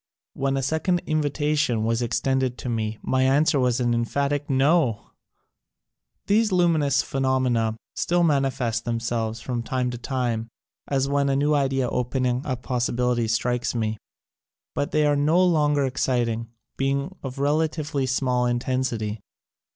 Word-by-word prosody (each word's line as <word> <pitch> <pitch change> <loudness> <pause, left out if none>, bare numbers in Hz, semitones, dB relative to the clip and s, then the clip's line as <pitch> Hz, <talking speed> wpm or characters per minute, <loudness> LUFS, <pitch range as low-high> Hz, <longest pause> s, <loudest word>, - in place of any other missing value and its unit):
When 135 0 -1
a 135 - -1
second 160 +6 0
invita 150 -1 0
tion 125 -7 +1
was 115 +1 0
extended 125 +2 0
to 125 - -5
me 110 -2 -2
my 130 0 +1
answer 140 +2 +3
was 125 -1 +1
an 120 -1 +1
emphatic 140 +5 -1
NO! 135 -4 +2 1.1
These 215 +1 +2
luminous 160 -7 +3
phenomena 130 -4 0 0.2
still 175 0 +1
mani 140 -4 +3
fest 115 -3 -2
themselves 115 -1 -2
from 120 -1 -3
time 125 +1 -1
to 120 - -6
time, 120 -3 -2 0.4
as 135 -1 0
when 140 0 +1
a 135 - +2
new 145 +2 +2
idea 135 -3 +1
opening 125 +1 -1
up 130 -2 -3
possibilities 120 -2 0
strikes 125 +1 -1
me, 110 -2 -1 0.7
but 145 - -1
they 150 0 +2
are 145 0 +3
no 155 +6 +3
longer 150 -5 +2
exciting, 120 -3 -1 0.3
being 140 +6 -1
of 135 0 -6
relatively 150 -1 0
small 125 -1 +1
intensity. 120 -4 -1
130 Hz, 145 wpm, -24 LUFS, 120-145 Hz, 1.1 s, answer